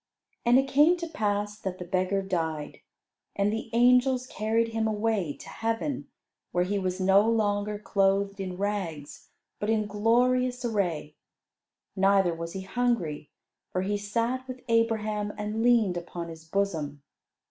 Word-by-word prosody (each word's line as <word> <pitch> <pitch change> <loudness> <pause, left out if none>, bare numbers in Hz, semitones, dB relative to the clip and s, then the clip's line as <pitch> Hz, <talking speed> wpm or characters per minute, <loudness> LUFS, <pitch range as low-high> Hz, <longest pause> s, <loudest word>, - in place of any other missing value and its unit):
And 240 +1 +6
it 270 +1 +3
came 300 +6 +5
to 340 -1 -4
pass 210 -6 -2
that 190 -3 -4
the 180 - -7
beggar 185 +2 0
died, 160 -5 -3 0.6
and 200 +1 +1
the 225 +1 -4
angels 250 +2 +4
carried 225 -1 0
him 225 0 0
away 210 -7 0
to - - -12
heaven, 225 +5 -2 0.4
where 175 - +2
he 200 +2 -1
was 185 -1 -2
no 195 +3 +4
longer 210 -2 0
clothed 200 -1 +1
in 185 -2 -4
rags, 185 -8 -4 0.3
but 210 - -2
in 220 -1 +2
glorious 245 +4 +2
array. 175 -9 -1 0.8
Neither 195 -2 +3
was 165 0 -6
he 190 - -4
hungry, 190 -9 -1 0.4
for 185 - -1
he 205 +2 0
sat 230 +5 -1
with 255 -1 -7
Abraham 215 -2 +1
and 210 +1 -2
leaned 225 -7 +3
upon 170 0 -6
his 160 -1 -10
bosom. 160 -6 -2
205 Hz, 145 wpm, -28 LUFS, 185-230 Hz, 0.8 s, And